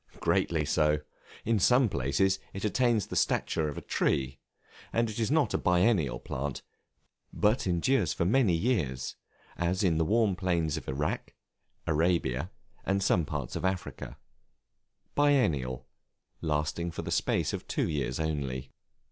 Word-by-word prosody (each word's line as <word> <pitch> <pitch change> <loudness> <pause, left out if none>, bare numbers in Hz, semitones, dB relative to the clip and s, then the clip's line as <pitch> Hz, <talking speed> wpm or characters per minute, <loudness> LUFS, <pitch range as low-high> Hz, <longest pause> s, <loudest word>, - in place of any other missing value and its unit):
Greatly 80 -3 +1
so. 75 0 +2 0.5
In 115 -1 +2
some 125 +6 +5
places 95 - +1
it 95 +2 -4
attains 115 -1 +2
the - - -7
stature 80 - +1
of 75 - -7
a - - -6
tree, 70 0 0 0.5
and 115 0 +1
is 110 0 -2
not 145 -5 +2
a - - +1
biennial 90 - +2
plant, 70 +1 -4 0.7
but 105 0 +1
endures 90 - +2
for 85 - -1
many 110 -1 +3
years, 80 - -1 0.4
as 90 +4 0
in 85 -4 +2
the - - +3
warm 105 +2 +2
plains 85 -5 0
of - - -6
Irak, 70 +3 -3 0.5
Arabia, 80 -2 +1 0.3
and 95 0 0
some 85 -3 +2
parts 70 -4 -4
of 85 - -3
Africa. 95 -1 -3 1.0
Biennial, 80 - +2 0.6
lasting 75 +2 -1
for - - -6
the - - -5
space - - +1
of - - -5
two - - 0
years 70 -4 -2
only. 70 -5 -3
85 Hz, 140 wpm, -29 LUFS, 75-105 Hz, 1.0 s, some